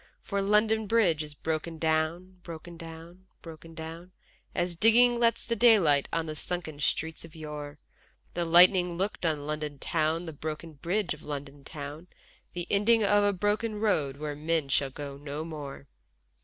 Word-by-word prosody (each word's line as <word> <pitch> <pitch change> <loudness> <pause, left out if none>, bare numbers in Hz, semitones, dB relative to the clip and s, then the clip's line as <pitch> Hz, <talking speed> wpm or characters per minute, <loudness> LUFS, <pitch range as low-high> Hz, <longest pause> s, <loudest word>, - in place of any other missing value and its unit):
For 200 -1 -1
London 215 +2 +2
Bridge 190 -9 +3
is 150 -1 -7
broken 160 +2 -3
down, 160 +4 -1
broken 170 0 -9
down, 165 +3 -11 0.2
broken 165 0 -11
down, 165 +3 -8 0.4
As 175 0 -1
digging 235 +5 +5
lets 230 -1 +2
the 235 - -1
daylight 195 -13 +5
on 165 -1 0
the 155 - -4
sunken 160 -2 -4
streets 160 +2 -1
of 165 -1 -13
yore, 150 -2 -7 0.6
The 175 - -1
lightning 175 +1 +6
looked 190 -2 -1
on 150 -2 -1
London 150 -1 -4
town, 160 +5 0
the 160 - -6
broken 155 +2 -6
bridge 175 +6 -1
of 150 - -12
London 145 -1 -7
town, 150 +3 -8 0.5
The 175 -1 -4
ending 215 +3 +4
of 205 0 +4
a 205 - +4
broken 210 +3 -1
road 150 -11 +1
where 150 0 -4
men 155 -1 -1
shall 135 +1 +1
go 140 +1 -7
no 145 +2 -5
more. 145 - -7
165 Hz, 165 wpm, -29 LUFS, 150-185 Hz, 0.6 s, lightning